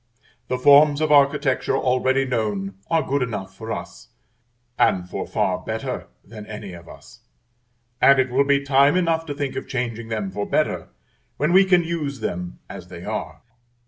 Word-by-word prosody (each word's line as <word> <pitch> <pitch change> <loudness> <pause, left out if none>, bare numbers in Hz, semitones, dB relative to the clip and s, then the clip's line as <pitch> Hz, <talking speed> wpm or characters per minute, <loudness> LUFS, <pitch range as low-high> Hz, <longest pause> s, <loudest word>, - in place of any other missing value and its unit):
The 125 - -1
forms 145 +2 +6
of 155 -1 0
architecture 140 -2 +3
already 130 +1 +1
known 105 -6 -2 0.2
are 165 -2 +2
good 140 +1 0
enough 100 -6 -4
for 110 +3 -7
us, 85 0 -7 0.7
and 90 -1 +2
for - - -5
far 90 -1 0
better 110 +4 -5 0.2
than 105 0 -11
any 105 -3 -8
of 85 -1 -12
us: - - -14 0.8
and 140 0 +7
it 130 -1 +1
will 135 +3 +3
be 140 0 +2
time 140 +4 +4
enough 165 -2 0
to 145 - -4
think 140 -2 -3
of 130 - -5
changing 115 -3 -3
them 105 -4 -3
for 100 +1 -4
better - - 0 0.5
when 150 +4 +1
we 190 +1 +7
can 180 -2 +4
use 155 -5 -3
them 90 -4 -4
as - - -10
they - - -10
are. - - -5
130 Hz, 175 wpm, -22 LUFS, 105-145 Hz, 0.8 s, and